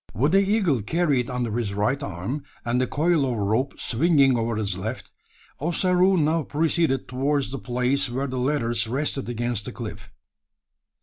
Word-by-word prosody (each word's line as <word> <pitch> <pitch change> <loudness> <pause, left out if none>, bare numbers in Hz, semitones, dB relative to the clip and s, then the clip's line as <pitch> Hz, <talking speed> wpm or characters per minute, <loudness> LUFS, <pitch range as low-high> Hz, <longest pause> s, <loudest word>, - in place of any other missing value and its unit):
With 140 - +2
the 195 - +5
eagle 195 - +2
carried 140 - +1
under 120 -3 -2
his 110 -5 -2
right 105 +8 0
arm, 100 +7 -4 0.2
and 120 +2 +1
the 130 - +1
coil 160 +1 +2
of 125 -3 -1
rope 110 +7 0
swinging 140 0 +3
over 115 -1 -1
his 105 -3 -2
left, 110 +7 -5 0.5
Ossaroo 180 +4 +3
now 160 +1 +2
proceeded 155 -2 0
towards 135 +1 0
the 135 - -4
place 125 +2 0
where 130 +3 -2
the 130 -2 -3
ladders 120 -4 0
rested 135 +1 -2
against 120 -3 -2
the - - -5
cliff. - - -8
130 Hz, 165 wpm, -24 LUFS, 120-150 Hz, 0.5 s, the